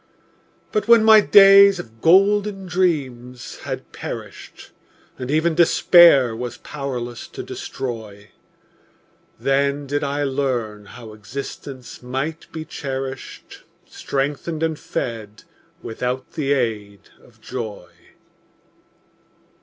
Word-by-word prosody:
But 215 - -1
when 230 -1 +6
my 220 0 +8
days 200 -1 +7
of 115 -8 -11
golden 195 +2 +3
dreams 135 -9 -2
had - - -6
perished, - - -9 0.5
And 125 0 -5
even 160 +3 +1
Despair 165 -6 +5
was 120 0 -6
powerless 125 -5 -6
to - - -8
destroy, 110 -6 -7 1.1
Then 140 +1 0
did 145 +1 -2
I 145 +1 -2
learn 125 -7 -2
how 110 0 -12
existence 130 +3 -9
might 135 +6 -5
be 160 -1 -7
cherished, 135 -3 -7 0.2
Strengthened 145 +4 -3
and 160 -2 -1
fed 110 -3 -6 0.4
without 125 +3 -4
the 145 -3 -1
aid 105 -6 -3
of - - -22
joy. 110 -5 -7
135 Hz, 100 wpm, -21 LUFS, 120-160 Hz, 1.1 s, my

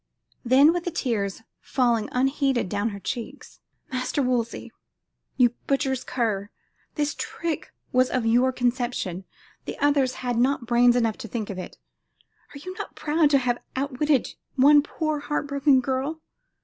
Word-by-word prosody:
Then 270 +6 +6
with 350 -1 -3
the - - 0
tears 225 - -2 0.2
falling 235 -5 0
unheeded 270 -2 +1
down 205 +3 0
her 200 -2 -7
cheeks, 235 +3 -6 0.3
"Master 255 +2 -1
Wolsey, 240 -2 -1 0.7
you 245 -3 +5 0.2
butcher's 270 -2 0
cur! 210 -5 -2 0.5
This 295 -1 0
trick 335 -4 -4 0.2
was 255 0 +3
of 250 -3 -1
your 245 +3 +4
conception; 245 -7 -2 0.4
the - - -5
others 280 -3 +2
had 245 -1 0
not 255 0 +1
brains 240 +1 +4
enough 230 -2 +1
to 245 - -6
think 220 -3 -4
of 190 - -6
it. 185 - -8 0.7
Are - - -10
you 370 +6 -7
not - - -6
proud 305 0 +2
to 285 - +5
have 245 -2 -1
outwitted 280 0 +1 0.3
one 290 +2 +7
poor 310 0 -2
heart 295 0 -2
broken 280 -1 +3
girl? 270 +5 -2
255 Hz, 150 wpm, -25 LUFS, 235-285 Hz, 0.7 s, one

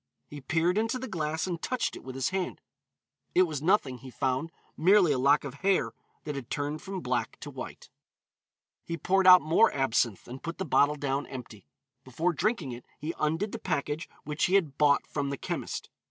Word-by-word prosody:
He 145 -1 -10
peered 165 +7 +1
into 225 +3 0
the 260 +1 -5
glass 160 -5 -2
and 175 -3 -4
touched 255 -1 -1
it - - -10
with 130 0 -8
his 135 -1 0
hand. 190 -1 -3 0.8
It 185 - +7
was 155 -6 -3
nothing, 150 -8 +2
he 130 - -10
found, 130 +5 -1 0.2
merely 185 0 +5
a 135 - +1
lock 140 +3 +4
of 140 -3 -6
hair 195 0 +2 0.3
that 150 - -4
had 135 -4 -6
turned 145 +1 -2
from 195 -2 -5
black - - -2
to - - -7
white. - - -8 1.0
He 170 - -4
poured 190 +2 +2
out 180 0 +10
more 165 +9 +4
absinthe, 120 -6 0
and 130 +2 -8
put 165 0 -5
the 190 - -3
bottle 145 -1 +3
down 140 -1 -2
empty. 115 - -9 0.4
Before 160 +8 -1
drinking 175 - 0
it 120 0 -8
he 155 +3 -4
undid 165 +7 0
the - - -5
package 150 -1 -2
which 150 +1 0
he 185 - +2
had 160 -9 +2
bought 145 -1 +3
from 140 -2 -3
the 140 - -3
chemist. - - -4
155 Hz, 200 wpm, -29 LUFS, 140-185 Hz, 1.0 s, out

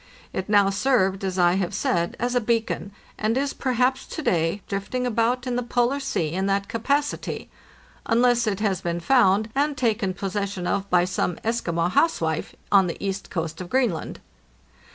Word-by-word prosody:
It 190 +2 -4
now 200 -2 +4
served, 195 -3 +1
as 190 -1 -2
I 175 -1 +4
have 185 -3 -2
said, 170 -1 0
as 245 +1 -1
a 245 - +2
beacon, 225 -2 -1 0.3
and 220 +3 +1
is 275 +1 0
perhaps 255 0 0
to 315 - -6
day 170 - 0
drifting 205 +6 -2
about 240 +2 +1
in 245 -1 -1
the - - 0
Polar 245 +3 +1
Sea 220 - -1
in 190 +3 -1
that 200 0 0
capacity 280 +6 -2 0.3
— - - -28
unless 240 0 +3
it 205 -1 -1
has 200 -4 0
been 170 0 -2
found 215 0 +3
and 285 +1 0
taken 220 -6 0
possession 195 -1 -3
of 200 +2 -1
by 180 -1 +4
some 180 -1 -1
Eskimo 175 -7 0
housewife 165 - +1 0.2
on 195 -2 +5
the 170 - -4
east 195 0 -4
coast 165 -1 -4
of 180 - -7
Greenland. 240 -10 0
205 Hz, 175 wpm, -24 LUFS, 185-245 Hz, 0.3 s, on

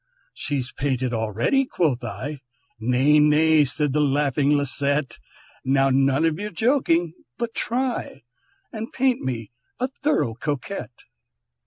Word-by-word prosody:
"She's 130 -4 -3
painted 130 -3 -1
already," 115 - +1
quoth 150 - 0
I; 140 +5 -5 0.4
"Nay, 125 +6 +3
nay!" 150 +1 +5
said 140 +1 0
the 150 - +2
laughing 145 0 +1
Lisette, 140 0 0 0.4
"Now 135 0 +3
none 135 +3 +3
of 160 +1 0
your 210 +1 -3
joking, 175 - +1 0.2
but 235 -1 -3
try 245 - -2 0.5
And 225 +1 -5
paint 260 -1 +1
me 120 -4 -4 0.3
a 255 +2 0
thorough 290 - +1
Coquette." 145 - -5
145 Hz, 125 wpm, -23 LUFS, 130-175 Hz, 0.5 s, nay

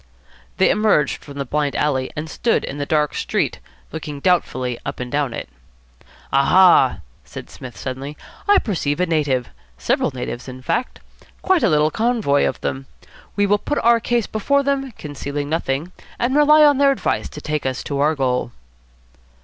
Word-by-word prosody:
They - - +4
emerged 210 -9 +1
from 140 -1 -11
the 140 - -3
blind 145 +2 -1
alley 130 -3 0
and 155 +1 -4
stood 230 +8 0
in 140 - -6
the 145 - -3
dark 150 -2 +1
street, - - -1 0.3
looking 150 -2 -6
doubtfully 130 -8 0
up - - -5
and 125 -1 -5
down 145 -3 0
it. - - -6 0.9
"Aha!" 180 +7 +5 0.2
said - - -10
Psmith 125 -2 -10
suddenly, 135 +3 -6 0.3
"I 405 0 +6
perceive 165 - -1
a 180 - +3
native. 145 -7 0 0.3
Several - - 0
natives, 125 -1 -6
in 130 0 -9
fact. 250 - -2 0.4
Quite 375 -3 +3
a 225 - +3
little 150 0 +3
covey 220 -11 +1
of - - -2
them. 135 +1 -4 0.5
We 205 - +2
will 205 +1 +2
put 295 - -2
our 235 0 +5
case 235 -1 0
before 280 +8 0
them, 275 -1 -1
concealing 145 -3 -5
nothing, 155 +1 -2 0.3
and 255 +3 0
rely 300 +1 +6
on 290 -2 +4
their 280 -1 +5
advice 275 - -1
to - - -9
take 150 -3 -2
us 130 -1 -3
to 140 -1 -3
our 150 +2 +2
goal." 125 -3 -1
150 Hz, 175 wpm, -20 LUFS, 140-220 Hz, 0.9 s, I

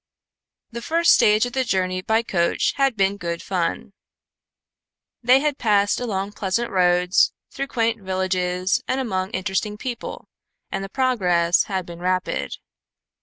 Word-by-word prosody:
The 235 +1 -6
first 335 +6 +3
stage 215 +2 +4
of 245 - -6
the 265 - +1
journey 185 -5 -1
by 220 +4 +1
coach 170 -6 0
had 275 -3 +2
been 195 +1 +1
good 170 -3 -4
fun. 185 +2 -2 1.3
They 255 +3 +5
had 295 -1 -1
passed 205 -3 +2
along 200 -5 -3
pleasant 205 +4 -2
roads, 180 -1 +3 0.2
through 275 0 -4
quaint 230 -3 -1
villages 185 -1 -1
and 260 - 0
among 190 -7 -2
interesting 190 +3 -2
people, 240 0 -6 0.4
and 195 0 -4
progress 180 -10 +2
had 190 -3 -3
been 170 -1 -10
rapid. 185 +1 -1
195 Hz, 135 wpm, -22 LUFS, 185-235 Hz, 1.3 s, They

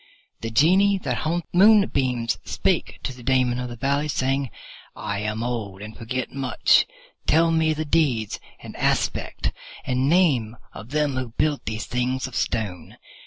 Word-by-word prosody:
The 115 - -4
Genie 185 - +4
that 130 -9 -2
haunts 170 +2 -2
the 175 - +1
moonbeams 135 - +4
spake - - -1
to 130 - -3
the 125 - -13
Daemon 125 0 +2
of 125 0 -4
the 120 - -7
Valley, 140 +4 0
saying, 135 -1 0 0.5
"I 100 0 -3
am 110 +2 -2
old, 105 -5 -4
and 110 +1 -9
forget 125 +2 -4
much. 130 -2 +3 0.4
Tell 165 +2 +4
me 160 -1 +2
the 155 +1 -3
deeds 140 -9 +1 0.2
and - - -10
aspect - - 0 0.3
and 130 +2 +1
name 135 -11 +2 0.2
of 105 +4 -10
them 145 -2 0
who 125 -3 -4
built 150 -2 0
these 110 0 -3
things 125 +1 -1
of 130 - -8
Stone." 100 -8 -3
130 Hz, 165 wpm, -24 LUFS, 115-150 Hz, 0.5 s, Genie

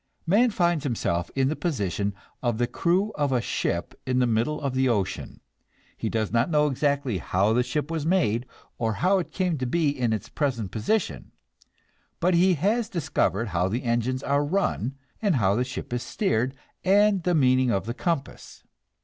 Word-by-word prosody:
Man 210 +9 +4
finds 175 -7 +1
himself 85 - -1
in 135 -1 +2
the 155 - -1
position 100 - -2 0.3
of 120 -3 0
the 120 - +2
crew 185 - +1
of 145 -2 0
a 125 - +2
ship - - -2
in 130 0 -1
the 125 - +4
middle 120 +6 0
of 140 -3 -2
the 130 0 +2
ocean; 100 -6 -2 0.5
he - - -3
does 110 -2 -1
not 115 +5 +2
know 150 -2 +3
exactly 140 -6 0
how 95 +6 +1
the 125 - +3
ship 145 +5 -2
was 160 -3 -2
made, 130 - +1 0.3
or 115 -1 0
how 185 - +2
it 175 - -4
came 180 -5 -1
to 130 - -1
be 160 +3 +2
in 125 -5 0
its 110 -3 -2
present 120 -10 -2
position, 175 - -1 0.9
but 180 +2 +2
he 180 +2 +4
has 215 - 0
discovered 120 - 0
how 90 -1 +1
the 115 +7 -2
engines 120 +2 0
are 140 +1 +1
run, 145 - -1 0.3
and 200 -6 +2
how 100 -6 +3
the 120 +4 +1
ship 125 -1 -6
is 120 - -1
steered, 130 - -1 0.3
and 200 0 +4
the 175 +1 +1
meaning 130 -3 +4
of 95 -4 0
the 115 - -3
compass. 150 0 -4
130 Hz, 185 wpm, -26 LUFS, 115-170 Hz, 0.9 s, Man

